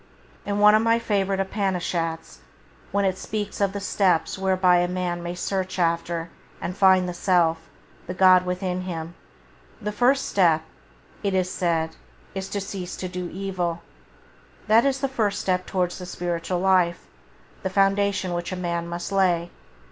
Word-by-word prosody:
In 200 Hz, 0 st, -1 dB
one 210 Hz, 0 st, +7 dB
of 215 Hz, -, +5 dB
my 230 Hz, 0 st, +3 dB
favourite 200 Hz, -4 st, 0 dB
Upanishats, 180 Hz, -4 st, -2 dB, 0.5 s
when 200 Hz, 0 st, +1 dB
it 190 Hz, 0 st, 0 dB
speaks 210 Hz, -2 st, -4 dB
of 200 Hz, -1 st, +2 dB
the 200 Hz, -, -4 dB
steps 195 Hz, -3 st, +1 dB
whereby 185 Hz, -1 st, +3 dB
a 175 Hz, 0 st, +2 dB
man 180 Hz, -1 st, -2 dB
may 175 Hz, +1 st, -4 dB
search 185 Hz, +1 st, -2 dB
after 170 Hz, -1 st, -1 dB, 0.3 s
and 180 Hz, -, -4 dB
find 190 Hz, -2 st, +5 dB
the 180 Hz, -, -3 dB
Self, 175 Hz, -2 st, +2 dB, 0.5 s
the 180 Hz, -, -4 dB
God 185 Hz, -1 st, +6 dB
within 180 Hz, 0 st, -2 dB
him, 170 Hz, -2 st, -5 dB, 0.7 s
the 210 Hz, -2 st, -3 dB
first 255 Hz, +5 st, +2 dB
step, 165 Hz, -5 st, +3 dB, 0.6 s
it 200 Hz, -2 st, 0 dB
is 185 Hz, -1 st, 0 dB
said, 165 Hz, -2 st, -1 dB, 0.4 s
is 195 Hz, 0 st, -5 dB
to 205 Hz, -, -2 dB
"cease 195 Hz, -2 st, -5 dB
to 185 Hz, -, -4 dB
do 180 Hz, -1 st, -5 dB
evil". 180 Hz, -3 st, -3 dB, 0.8 s
That 220 Hz, +3 st, +5 dB
is 270 Hz, -1 st, +1 dB
the 275 Hz, -, +1 dB
first 220 Hz, -7 st, -1 dB
step 185 Hz, -1 st, -1 dB
towards 180 Hz, -2 st, -1 dB
the 180 Hz, -, -7 dB
spiritual 175 Hz, 0 st, -2 dB
life, 185 Hz, -2 st, +2 dB, 0.6 s
the 190 Hz, -, -2 dB
foundation 195 Hz, -1 st, +1 dB
which 175 Hz, +1 st, -3 dB
a -, -, -2 dB
man 170 Hz, -1 st, -2 dB
must 175 Hz, +2 st, -5 dB
lay. 175 Hz, -3 st, +2 dB
185 Hz, 165 wpm, -24 LUFS, 175-195 Hz, 0.8 s, one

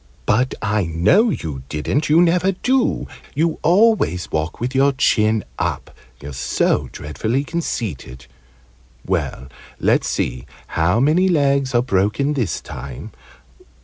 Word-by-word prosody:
"But 125 Hz, +4 st, +1 dB
I 105 Hz, -2 st, +1 dB
know 85 Hz, -, +3 dB
you 75 Hz, -, -4 dB
didn't! 105 Hz, -, -1 dB
You 165 Hz, +3 st, +6 dB
never 180 Hz, +3 st, +2 dB
do! 250 Hz, +6 st, 0 dB, 0.3 s
You 160 Hz, +2 st, 0 dB
always 180 Hz, -, +2 dB
walk 80 Hz, +1 st, -2 dB
with 125 Hz, +3 st, -3 dB
your 135 Hz, +1 st, +3 dB
chin 110 Hz, -5 st, +2 dB, 0.2 s
up -, -, -3 dB, 0.2 s
you're 70 Hz, 0 st, -8 dB
so 65 Hz, -, 0 dB
dreadfully 110 Hz, -, -2 dB
conceited. 95 Hz, -, -4 dB, 0.8 s
Well, 65 Hz, -, -2 dB, 0.3 s
let's -, -, +2 dB
see 60 Hz, -, -2 dB, 0.2 s
how 90 Hz, +7 st, +1 dB
many 160 Hz, +8 st, +3 dB
legs 140 Hz, -5 st, +1 dB
are 120 Hz, -, +4 dB
broken 110 Hz, +6 st, +1 dB
this 125 Hz, -10 st, -2 dB
time. 65 Hz, -2 st, -8 dB
125 Hz, 125 wpm, -20 LUFS, -, 0.8 s, You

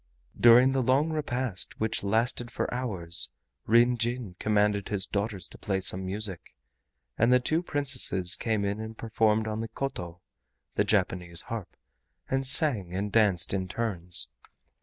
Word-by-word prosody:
During 120 Hz, +3 st, +6 dB
the 135 Hz, 0 st, 0 dB
long 135 Hz, +6 st, +2 dB
repast, 130 Hz, -, -3 dB
which 110 Hz, -1 st, -1 dB
lasted 115 Hz, +4 st, 0 dB
for -, -, -3 dB
hours, 85 Hz, -, -2 dB, 0.4 s
Ryn 120 Hz, +2 st, +4 dB
Jin 115 Hz, -4 st, -3 dB
commanded 105 Hz, -2 st, +1 dB
his 100 Hz, -2 st, -1 dB
daughters 100 Hz, -3 st, -3 dB
to -, -, -13 dB
play 95 Hz, -2 st, -1 dB
some 95 Hz, 0 st, -1 dB
music, 95 Hz, -1 st, -4 dB, 0.6 s
and 115 Hz, +2 st, +3 dB
the 125 Hz, -, +5 dB
two 155 Hz, +6 st, 0 dB
Princesses 130 Hz, -, +1 dB
came 110 Hz, -3 st, -1 dB
in 100 Hz, +1 st, -2 dB
and 110 Hz, 0 st, -7 dB
performed 110 Hz, -1 st, 0 dB
on 110 Hz, 0 st, -3 dB
the 115 Hz, -, -4 dB
KOTO 90 Hz, -8 st, -6 dB, 0.5 s
(the -, -, +1 dB
Japanese 85 Hz, -2 st, -1 dB
harp), 115 Hz, -5 st, -7 dB, 0.5 s
and 135 Hz, 0 st, +1 dB
sang 115 Hz, -, +5 dB
and 100 Hz, +2 st, -3 dB
danced 100 Hz, -6 st, +2 dB
in 95 Hz, -1 st, -2 dB
turns. 90 Hz, -5 st, +1 dB
110 Hz, 150 wpm, -27 LUFS, 95-125 Hz, 0.6 s, During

